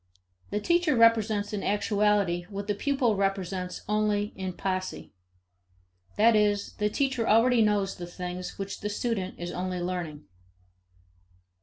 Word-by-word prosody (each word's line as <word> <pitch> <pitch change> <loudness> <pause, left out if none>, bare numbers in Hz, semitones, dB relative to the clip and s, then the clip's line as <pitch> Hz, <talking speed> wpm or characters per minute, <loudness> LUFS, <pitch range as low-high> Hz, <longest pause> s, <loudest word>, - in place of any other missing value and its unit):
The 205 - -1
teacher 340 +2 +2
presents 215 -2 -3
in 205 - -2
actuality 205 -4 +1
what 200 0 -5
the 205 - 0
pupil 250 0 +1
represents 195 -2 -2
only 210 0 0
in 185 -1 -4
posse. 185 0 -4 1.0
That 225 +2 +5
is, 205 -1 +1
the 210 0 +2
teacher 260 -1 0
already 230 +2 +5
knows 205 -2 +1
the 175 -2 -7
things 180 +1 -6
which 195 0 -5
the 210 - -3
student 210 -3 -2
is 175 0 -5
only 180 0 -3
learning. 175 -4 -4
205 Hz, 135 wpm, -28 LUFS, 185-215 Hz, 1.0 s, That